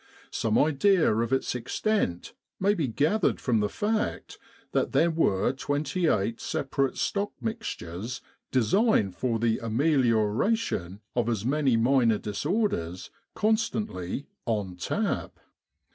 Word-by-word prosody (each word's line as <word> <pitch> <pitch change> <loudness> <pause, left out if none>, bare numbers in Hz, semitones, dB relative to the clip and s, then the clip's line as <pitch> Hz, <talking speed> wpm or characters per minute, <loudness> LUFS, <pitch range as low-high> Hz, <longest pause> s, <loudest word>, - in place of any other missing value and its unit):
Some 110 -1 +1
idea 160 - +4
of 115 +2 0
its 135 - +1
extent 125 - -1 0.3
may 200 +2 +3
be 165 -9 -1
gathered 155 - +1
from 120 -4 +1
the 105 0 0
fact 215 - -2 0.3
that - - 0
there 170 +1 +4
were 105 -12 +2
28 145 - 0
separate 135 -1 -1
stock 200 0 -1
mixtures, 120 - -5 0.3
designed 130 - +2
for 120 0 0
the 115 0 +1
ameliora 115 - +2
tion 95 - -4
of 120 -1 +1
as 110 -2 -1
many 135 -3 +2
minor 120 -2 +3
disorders, 105 - -2 0.2
constantly 210 - -1 0.2
"on 105 -5 -1
tap." 90 - -2
130 Hz, 115 wpm, -27 LUFS, 110-180 Hz, 0.3 s, idea